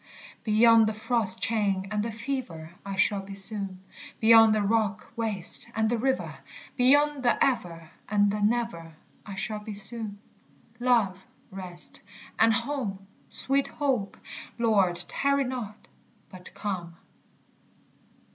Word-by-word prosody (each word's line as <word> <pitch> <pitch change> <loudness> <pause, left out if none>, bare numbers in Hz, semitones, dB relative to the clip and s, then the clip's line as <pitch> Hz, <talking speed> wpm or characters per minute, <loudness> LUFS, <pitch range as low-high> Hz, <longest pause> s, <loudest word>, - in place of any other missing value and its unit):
Beyond 225 0 +5
the 215 - -2
frost 215 -3 +4
chain 200 -4 0
and 210 0 -1
the 230 +2 -3
fever 220 -9 -6
I 195 -1 -6
shall 195 +1 +1
be 195 0 -10
soon; 195 -2 -1 0.4
Beyond 225 -1 +6
the 210 - 0
rock 215 0 -1
waste 215 -6 +4
and 220 0 0
the 240 - +1
river, 265 +2 -2 0.4
Beyond 285 +3 +3
the 245 -1 +2
ever 170 -10 -3 0.2
and 205 -1 +2
the 210 0 -3
never, 205 -7 -2 0.3
I 200 - -7
shall 210 +3 -4
be 210 0 -8
soon. 210 0 -5 0.6
_Love, 235 -7 +2 0.3
rest, 180 -2 -2 0.4
and 225 +1 +5
home! 235 -5 -3 0.2
Sweet 275 +1 +1
hope! 260 -9 -2 0.4
Lord, 205 -7 +2
tarry 280 0 0
not, 245 -5 -7 0.4
but 185 -1 -13
come. 175 -5 -5
215 Hz, 130 wpm, -26 LUFS, 195-235 Hz, 0.6 s, Beyond